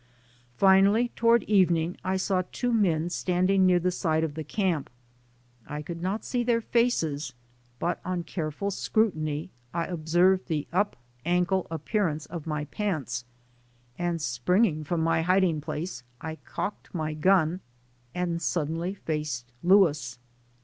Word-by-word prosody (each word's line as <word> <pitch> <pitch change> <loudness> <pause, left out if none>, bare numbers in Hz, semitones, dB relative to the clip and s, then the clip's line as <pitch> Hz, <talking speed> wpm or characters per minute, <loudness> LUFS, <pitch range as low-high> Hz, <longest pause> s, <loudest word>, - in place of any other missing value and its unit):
Finally, 200 +5 +5
toward 235 0 +4
evening, 175 -4 +2
I 190 +1 0
saw 185 0 +1
two 245 -1 -1
men 175 -6 +2
standing 185 +2 +2
near 180 -1 +5
the 180 +1 +1
side 160 -3 0
of 160 -2 -2
the 155 +1 -5
camp. 175 -2 -1 0.8
I 150 0 -5
could 170 +2 -6
not 190 +5 -2
see 245 -1 0
their 235 -1 +2
faces, 160 - 0 0.4
but 175 +6 -2
on 180 -1 -2
careful 165 +4 -3
scrutiny, 160 -7 0 0.2
I 170 -1 0
observed 175 +3 +2
the 155 -4 -2
up 205 +3 +1 0.3
ankle 180 +2 +1
appearance 165 -1 -1
of 165 -2 -7
my 150 -1 -2
pants, 155 - -3 0.7
and 175 -1 -1
springing 155 - +1
from 165 +2 -1
my 165 0 +2
hiding 180 -2 +2
place 155 -3 -4 0.2
I 160 0 -6
cocked 200 - -6
my 155 -2 -2
gun 175 +1 +3 0.6
and 175 -2 -1
suddenly 165 +3 -1
faced 150 -9 -4
Louis. 155 -10 +3
175 Hz, 135 wpm, -27 LUFS, 155-190 Hz, 0.8 s, Finally